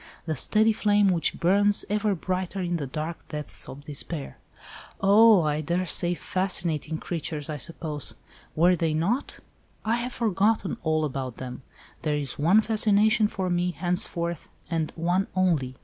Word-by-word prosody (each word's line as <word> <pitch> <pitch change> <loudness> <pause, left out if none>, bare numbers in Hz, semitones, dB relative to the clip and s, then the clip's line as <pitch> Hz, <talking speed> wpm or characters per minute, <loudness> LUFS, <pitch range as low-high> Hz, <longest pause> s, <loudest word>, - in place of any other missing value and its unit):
The 160 -2 -2
steady 215 - +3
flame 205 -1 +3
which 175 -3 +1
burns 200 +3 +3
even 210 0 0
brighter 185 +2 -3
in 175 -2 -1
the 145 -4 -4
dark 155 +5 -5
depths 150 -1 -2
of 140 +2 -10
despair." 145 +1 -6 0.6
"Oh! 205 -1 +6
I 150 0 0
daresay—fascinating 175 -1 0
creatures, 155 -3 -4
I 150 - -4
suppose—were 160 +2 -2
they 160 -2 0
not?" 205 - -1 0.4
"I 225 +2 +2
have 245 +1 -4
forgotten 210 -2 +1
all 155 -1 +1
about 130 -4 -4
them. 125 0 -7 0.4
There 150 -1 0
is 145 -1 -3
one 180 +9 +5
fascination 215 0 +3
for 190 -3 -3
me, 175 0 +1
henceforth, 170 0 -2 0.2
and 160 -2 -1
one 175 +4 0
only. 160 -9 +1
175 Hz, 140 wpm, -26 LUFS, 155-200 Hz, 0.6 s, Oh